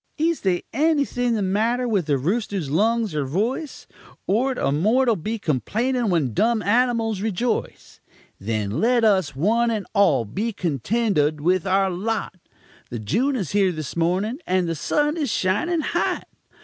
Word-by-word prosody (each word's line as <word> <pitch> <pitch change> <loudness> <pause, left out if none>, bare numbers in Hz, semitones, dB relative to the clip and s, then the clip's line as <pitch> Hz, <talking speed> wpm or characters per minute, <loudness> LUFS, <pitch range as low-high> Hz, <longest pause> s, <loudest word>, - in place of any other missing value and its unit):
Is 330 +1 0
they 185 -3 0
anything 280 -4 +1
the 210 - -1
matter 225 +6 0
with 200 -8 0
the 145 -2 +2
rooster's 185 - -2
lungs 220 +3 +1
er 150 -1 -1
voice? 220 - -3 0.4
Ort 250 +5 +1
a - - 0
mortul 225 - +2
be 215 +6 -4
complanin' 225 - -1
when 155 - 0
dumb 225 - +1
animals 225 -1 +1
rejoice? 220 +3 -3 0.4
Then 105 0 -2
let 240 +1 +3
us, 190 -9 +2
one 225 - +2
and 215 -3 -2
all, 195 - +3
be 215 - -3
contentud 165 - 0
with 180 +4 +1
our 190 0 +2
lot; 215 +6 -2 0.6
The 120 - -5
June 230 - 0
is 195 - -3
here 195 -2 +3
this 155 -5 -6
mornin', 185 - 0
and 185 -1 +1
the 165 - -1
sun 295 - 0
is 295 -5 -1
shining 215 - 0
hot. - - -1
205 Hz, 155 wpm, -23 LUFS, 170-235 Hz, 0.6 s, let